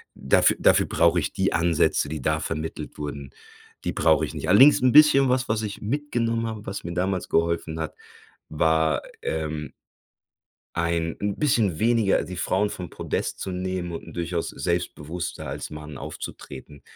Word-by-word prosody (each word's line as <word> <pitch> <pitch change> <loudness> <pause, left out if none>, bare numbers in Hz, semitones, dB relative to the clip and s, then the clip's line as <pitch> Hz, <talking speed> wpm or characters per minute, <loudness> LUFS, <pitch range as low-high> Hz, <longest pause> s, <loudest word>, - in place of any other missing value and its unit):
dafü 65 - +3
dafür - - +4
brauche 85 +1 +3
ich 75 - -3
die 95 0 +1
Ansätze, 85 -3 +2
die 75 -3 -5
da 80 +3 +1
vermittelt 80 0 -5
wurden, 70 -2 -6 0.5
die - - -2
brauche 80 -1 +3
ich - - -8
nicht. - - -5
Allerdings 130 +11 +7
‘n 130 - +4
bisschen 150 -3 +7
was 130 +1 +1
was 110 0 +1
ich 105 -1 -5
mitgenommen 115 -2 -1
habe, 110 -2 -6
was 100 +1 -5
mir 85 - -4
damals 95 +1 -1
geholfen 85 -1 0
hat, 80 - -4 0.6
war, 80 -2 +1 0.2
ähm, 75 -1 -3 1.0
ein 85 -1 -1
‘n 100 -1 -1
bisschen 110 - +1
weniger 115 -3 +3
die 90 - -7
Frauen 95 +4 +1
vom 90 -3 -7
Podest - - -3
zu 95 - -4
nehmen 90 -1 -3
und 85 - -6
‘n - - -10
durchaus 85 -1 -2
selbstbewusster 85 -1 -3
als - - -5
Mann 75 -2 -8
aufzutreten. 75 -1 -9
85 Hz, 165 wpm, -25 LUFS, 80-105 Hz, 1.0 s, Allerdings